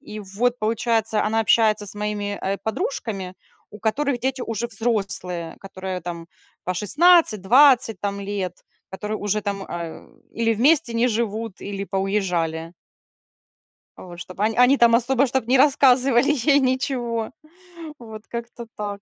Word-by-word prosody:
И 215 -7 -9
вот 225 +5 -1
получается, 225 0 0
она 220 +1 +1
общается 215 -1 +2
с 200 - -9
моими, 205 -1 -3
э, 195 +1 -2
подружками, 220 - -4 0.4
у 210 - -11
которых 255 +5 -1
дети 260 +1 -2
уже 230 0 -3
взрослые, 195 -7 -3
которые 190 -1 -6
там 170 -1 -7 0.4
по 185 - -2
16, 295 - +4
20 245 0 +5
там 200 0 -3
лет, 195 -3 -5 0.3
которые 210 +3 -4
уже 210 0 -1
там, 200 -1 -3
а, 170 -1 -7 0.3
или 230 0 +1
вместе 265 +2 +3
не 230 +2 +2
живут, 225 -2 -3
или 200 -1 -5
поуезжали. 180 -5 -2 1.3
Вот. 175 -1 -11
Чтобы 185 +2 -5
они 220 +1 +1
они 250 +3 +5
там 235 -2 +5
особо, 260 +3 +2
чтоб 260 -1 -1
не 260 +2 +4
рассказывали 265 -1 +4
ей 285 +1 +3
ничего. 255 -4 -1 0.7
Вот 220 -2 -11
как-то 235 0 -7
так. 205 -1 -5
220 Hz, 140 wpm, -22 LUFS, 195-245 Hz, 1.3 s, 20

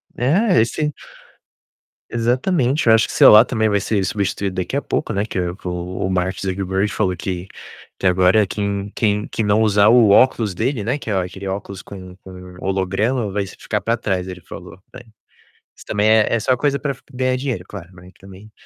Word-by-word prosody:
É, 165 - +2
esse 150 +7 -1 1.2
Exatamente. 130 +4 0
Eu 110 - +7
acho 110 - +3
que - - -7
celular 110 +2 +8
também 110 -3 0
vai 100 -1 +1
ser 100 0 -1
substituído 100 -2 -2
daqui 90 - -3
a - - 0
pouco, - - -3
né, 100 +1 -1
que 100 - -4
o 90 -1 -2
o 90 +1 -4
Mark 95 0 -1
Zuckerberg 95 +1 -1
falou 95 -4 -1
que 90 +1 -5 0.5
que - - -5
agora 95 +3 +4
quem 100 0 -3
quem 105 -1 0
quem 110 - -2
não 105 +2 +2
usar 105 -2 +4
o 115 -2 +5
óculos 110 -1 +3
dele, 115 +4 -2
né, 125 +7 -1
que 130 - -8
a 95 -3 +1
aquele 95 +2 -8
óculos 95 0 -5
com 95 -2 -11
com 90 -1 -12
holograma 100 +5 -1
vai 100 +1 -1
s 95 - -10
ficar 105 - -3
pra 115 +4 0
trás, 95 -5 -2
ele 90 -1 -8
falou, 85 - -11 0.2
né. 125 - -10 0.7
Isso - - -16
também 105 +1 +1
é 110 -1 +4
é - - 0
só 125 +4 +1
coisa 140 +1 0
pra 145 - -2
f 125 - -20
ganhar 130 0 0
dinheiro, 130 -8 -3
claro, 95 -3 -10
né, 90 +1 -15
também. 95 +2 -14
100 Hz, 195 wpm, -19 LUFS, 95-115 Hz, 1.2 s, celular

